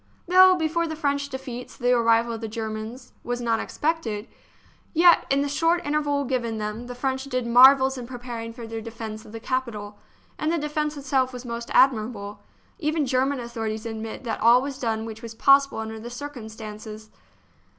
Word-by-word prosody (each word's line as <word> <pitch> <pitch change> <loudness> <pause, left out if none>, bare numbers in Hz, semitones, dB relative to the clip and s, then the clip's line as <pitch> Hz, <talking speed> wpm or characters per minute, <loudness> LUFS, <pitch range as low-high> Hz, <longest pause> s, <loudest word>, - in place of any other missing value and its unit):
Though, 370 +1 +7
before 335 0 0
the 315 - -4
French 280 -2 -1
defeats, 255 -2 -7
the 245 0 +1
arrival 230 -1 +3
of 225 - -6
the 225 - -3
Germans 220 +3 -6
was 245 0 -3
not 230 -2 0
expected, 250 -10 -2 0.7
yet 340 +2 +6
in 275 +1 +3
the - - -1
short 330 +4 +1
interval 290 -1 0
given 240 -4 -2
them 215 +3 -4
the 245 - -7
French 265 +1 -2
did 255 -3 -2
marvels 265 +2 +6
in 240 - -7
pre 250 0 -7
paring 235 -2 -6
for 230 0 -9
their 225 0 -5
defence 220 -1 -7
of - - -13
the 225 - -7
capital; 220 -5 -4 0.4
and 305 +1 0
the 340 - +1
defence 300 0 -2
itself 265 -2 0
was 250 0 -8
most 235 0 -5
admirable. 215 -5 +2 0.4
Even 310 -2 0
German 265 +1 +1
authorities 225 -2 -4
admit 225 0 -6
that 230 - -3
all 235 +3 +7
was 275 +1 -5
done 225 -3 -1
which 225 -1 -8
was 230 -1 -8
possible 275 +3 +4
under 220 0 -5
the 235 +2 -7
circumstances. 220 -5 -8
245 Hz, 180 wpm, -25 LUFS, 225-280 Hz, 0.7 s, Though